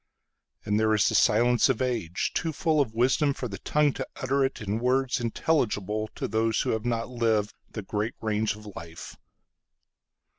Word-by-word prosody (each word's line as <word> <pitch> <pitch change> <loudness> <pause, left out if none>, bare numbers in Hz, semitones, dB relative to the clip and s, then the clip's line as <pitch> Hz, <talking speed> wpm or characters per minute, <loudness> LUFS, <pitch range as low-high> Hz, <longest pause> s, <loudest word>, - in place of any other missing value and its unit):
And 105 +1 +1
there 110 0 +3
is 105 - +3
the - - 0
silence 120 +4 +4
of 130 - +1
age, 115 -9 -1
Too 165 - -1
full 155 0 +2
of 110 -5 -2
wisdom 135 +4 +2
for 125 - -4
the 100 -3 -7
tongue 150 -2 +2
to - - -5
utter 130 +1 -1
itIn 110 -6 -1
words 130 +2 +1
intelligible 110 - 0
to - - -3
those 110 0 +1
who - - 0
have 110 +1 -2
not 115 -1 -1
livedThe 110 -3 -2
great 105 +3 -2
range 110 -1 0
of 105 0 -13
life. 85 0 -9
115 Hz, 170 wpm, -27 LUFS, 105-130 Hz, -, silence